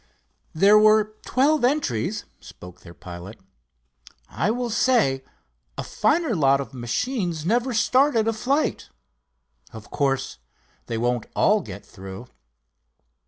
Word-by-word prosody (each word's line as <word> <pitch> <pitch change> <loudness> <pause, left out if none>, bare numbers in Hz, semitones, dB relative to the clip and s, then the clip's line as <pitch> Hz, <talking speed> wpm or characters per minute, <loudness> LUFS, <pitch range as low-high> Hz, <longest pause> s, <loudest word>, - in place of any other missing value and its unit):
"There 200 +6 +6
were 215 0 +4
twelve 285 +2 +2
entries," 215 - 0
spoke 90 0 -13
their 85 -1 -14
pilot. 90 +5 -10 0.9
"I - - -1
will 240 +1 -2
say, 215 - +2 0.5
a - - -3
finer 255 +3 0
lot 140 -4 +3
of 140 0 -6
machines 165 - -3
never 240 +6 +1
started 245 +1 +3
a 225 - +1
flight. 275 +7 -1 0.8
Of 110 -1 -12
course 135 - -1 0.5
they 115 - -3
won't 120 0 -1
all - - +3
get - - -10
through." 95 +4 -10
200 Hz, 120 wpm, -23 LUFS, -, 0.9 s, There